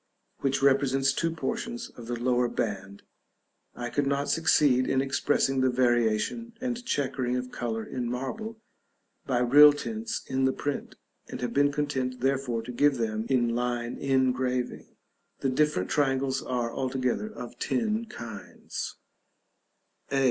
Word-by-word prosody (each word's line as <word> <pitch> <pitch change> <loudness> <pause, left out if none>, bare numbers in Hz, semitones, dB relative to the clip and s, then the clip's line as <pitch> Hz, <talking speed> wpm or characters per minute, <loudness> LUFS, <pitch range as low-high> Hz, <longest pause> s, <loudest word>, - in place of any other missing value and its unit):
which 135 0 0
represents 135 -1 +3
two 165 - 0
portions 230 - -4
of 120 -2 -11
the 120 -1 -3
lower 125 0 +2
band. 100 -4 -4 0.7
I 120 -1 -5
could 145 -1 0
not 140 +1 0
succeed 145 -5 +4
in 130 - +2
expressing 135 0 +1
the 130 - +4
variation 120 - +1
and 245 -1 -3
chequering 130 - -1
of 125 0 -3
color 115 -2 -3
in 125 -2 -3
marble, 215 - -4 0.7
by 125 -2 +1
real 145 +4 +8
tints 220 +9 -4
in 130 0 +1
the 130 - +2
print; 145 +1 -4 0.3
and - - -7
have 120 -1 -2
been 145 0 +4
content, 135 -3 -2
therefore, 130 -3 0
to 125 - -6
give 145 +2 +3
them 110 -1 -2
in 120 -3 +2
line 120 0 -1
engraving. 130 -2 0 0.5
The 135 - +1
different 130 -8 +1
triangles 135 -2 +1
are, 120 -2 -2
altogether, 130 - -1
of 120 - -9
ten 225 -1 0
kinds: 115 - -7 1.2
a. 135 - +2
130 Hz, 140 wpm, -28 LUFS, 120-145 Hz, 1.2 s, real